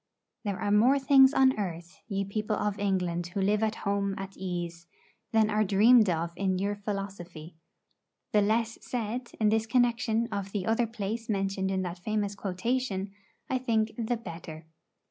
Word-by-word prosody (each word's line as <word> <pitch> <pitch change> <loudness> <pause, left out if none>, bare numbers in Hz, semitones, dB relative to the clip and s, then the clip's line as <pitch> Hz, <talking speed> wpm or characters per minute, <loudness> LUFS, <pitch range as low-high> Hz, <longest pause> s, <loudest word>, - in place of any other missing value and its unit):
There 200 -3 -3
are 205 - -1
more 235 +7 +5
things 270 -1 +6
on 265 -4 +3
earth, 175 -2 -5
ye 195 -2 -2
people 210 +2 -2
of 205 0 -2
England 180 -4 0
who 175 +3 -4
live 205 +2 +2
at 220 0 0
home 200 0 0
at 195 0 -7
ease, 175 -2 -5 0.4
than 220 -2 +3
are 215 +1 +2
dreamed 215 +2 +5
of 170 0 -1
in 190 -1 0
your 200 +2 -1
philosophy. 195 -5 -6 0.8
The 210 - +4
less 225 +2 0
said, 240 +1 -4
in 215 -1 +4
this 220 +1 +1
connection, 235 -1 +2
of 200 -1 -4
the 200 -3 -2
other 225 +1 +1
place 225 +1 -4
mentioned 195 -1 -1
in 190 -1 0
that 175 0 -5
famous 205 +1 -1
quotation, 200 +1 -2 0.4
I 260 - 0
think 225 -3 +1
the 235 0 -1
better. 165 -6 -9
205 Hz, 165 wpm, -29 LUFS, 190-225 Hz, 0.8 s, things